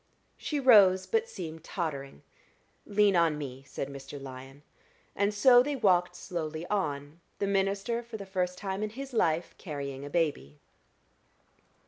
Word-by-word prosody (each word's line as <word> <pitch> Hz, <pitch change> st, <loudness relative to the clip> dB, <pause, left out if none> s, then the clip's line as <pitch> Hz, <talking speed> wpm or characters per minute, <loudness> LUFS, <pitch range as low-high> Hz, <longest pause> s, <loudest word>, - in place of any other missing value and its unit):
She 295 Hz, -, -3 dB
rose, 200 Hz, -8 st, +6 dB
but 455 Hz, +1 st, 0 dB
seemed 160 Hz, -3 st, -7 dB
tottering. 140 Hz, -, -5 dB, 0.6 s
"Lean 205 Hz, -1 st, +3 dB
on 165 Hz, -3 st, +3 dB
me," 135 Hz, -3 st, -6 dB
said 135 Hz, -, -4 dB
Mr. 140 Hz, +1 st, -9 dB
Lyon, 135 Hz, +1 st, -10 dB, 0.5 s
and 200 Hz, +1 st, +2 dB
so 245 Hz, +4 st, +6 dB
they 285 Hz, +3 st, -1 dB
walked 180 Hz, -7 st, +2 dB
slowly 165 Hz, -3 st, -5 dB
on, 150 Hz, -5 st, -2 dB, 0.2 s
the -, -, -1 dB
minister 200 Hz, +4 st, 0 dB
for 235 Hz, -1 st, -8 dB
the 200 Hz, -, -8 dB
first 180 Hz, -1 st, -2 dB
time 195 Hz, 0 st, -4 dB
in 215 Hz, -, -1 dB
his 270 Hz, +4 st, -8 dB
life 170 Hz, -6 st, +1 dB
carrying 140 Hz, -5 st, -5 dB
a 145 Hz, -, -6 dB
baby. 145 Hz, -, -1 dB
180 Hz, 145 wpm, -29 LUFS, 145-205 Hz, 0.6 s, rose